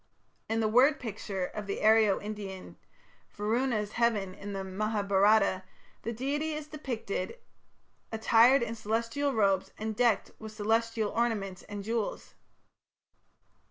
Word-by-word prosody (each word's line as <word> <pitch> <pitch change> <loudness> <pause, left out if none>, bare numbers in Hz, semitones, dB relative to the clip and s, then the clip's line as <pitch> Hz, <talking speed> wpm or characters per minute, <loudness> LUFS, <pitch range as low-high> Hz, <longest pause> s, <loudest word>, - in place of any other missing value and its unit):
In 225 0 +1
the 220 - +2
word 260 +7 +4
picture 205 -5 -4
of 210 +2 -7
the 200 - -3
Aryo 215 -2 +5
Indian 205 -3 -7 0.5
Varuna's 215 0 -1
heaven 220 -6 +1
in 200 +1 -8
the 195 -1 -4
Mahabharata 200 0 +2 0.4
the 230 - -3
deity 285 +7 -2
is 300 0 -5
depicted 260 - -4 0.7
"attired 230 +3 +5
in 230 -1 -3
celestial 230 +6 -1
robes 200 -5 +2
and 220 0 -3
decked 235 -3 +2
with 220 -1 -8
celestial 225 0 0
ornaments 210 -6 -1
and 205 -1 -5
jewels". 225 0 -3
220 Hz, 125 wpm, -30 LUFS, 205-235 Hz, 0.7 s, Aryo